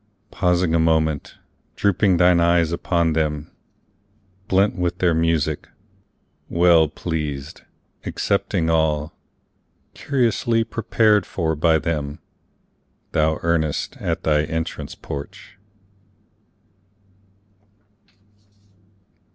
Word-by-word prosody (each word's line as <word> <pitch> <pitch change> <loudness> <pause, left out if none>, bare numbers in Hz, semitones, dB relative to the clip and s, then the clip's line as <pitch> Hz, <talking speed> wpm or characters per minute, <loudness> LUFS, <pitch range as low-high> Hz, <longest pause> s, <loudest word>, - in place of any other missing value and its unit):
pausing 90 -2 +1
a 85 - +3
moment, 80 -2 +1 0.4
drooping 100 -2 +2
thine 90 0 +4
eyes 85 -1 +3
upon 85 -1 0
them, 75 -1 -2 1.0
blent 95 +2 +2
with 90 -1 -2
their 90 -3 +2
music, 80 -2 0 0.8
Well 85 -2 +4
pleased, 75 -3 -5 0.4
accepting 80 - -1
all, 80 -1 +1 0.8
curiously 120 -4 0
prepared 110 -3 +1
for 80 -3 -1
by 80 +1 +3
them, 75 -2 -3 0.9
Thou 80 0 +2
enterest 80 -3 -1
at - - -2
thy 75 -1 +2
entrance 80 -2 -4
porch. 70 +7 -9
80 Hz, 85 wpm, -21 LUFS, 80-90 Hz, 1.0 s, thine